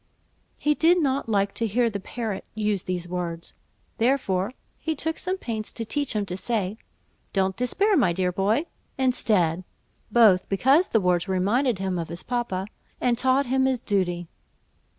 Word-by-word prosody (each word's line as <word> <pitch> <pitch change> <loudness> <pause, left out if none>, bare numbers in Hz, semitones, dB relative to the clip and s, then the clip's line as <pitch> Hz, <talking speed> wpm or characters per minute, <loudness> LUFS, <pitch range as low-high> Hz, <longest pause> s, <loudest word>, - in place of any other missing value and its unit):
He 300 - +2
did 330 +4 +4
not 275 -5 0
like 200 -2 +1
to 230 - -1
hear 235 +3 +2
the 205 -3 -3
parrot 215 0 -4
use 210 -3 0
these 180 -1 -4
words, 175 -1 -4 0.5
therefore 225 -5 +1 0.3
he 320 -1 -2
took 320 +2 -2
some 370 +1 -2
pains 220 - -4
to 230 - -4
teach 285 +3 -1
him 210 -1 0
to 180 -2 -4
say, 210 0 -2 0.5
"Don't 190 -1 +1
despair, 375 - +2
my 185 - +3
dear 180 +1 0
boy," 205 - +1 0.3
instead, 205 -10 +2 0.5
both 210 -5 +5
because 270 - +4
the 225 - +2
words 180 -2 +1
reminded 205 +6 +1
him 190 -2 -2
of 165 - -3
his 170 - -5
papa, 240 -7 -2 0.3
and 245 -1 +2
taught 260 +3 +2
him 265 +1 +2
his 260 -2 +1
duty. 175 -5 -1
215 Hz, 165 wpm, -25 LUFS, 185-260 Hz, 0.5 s, both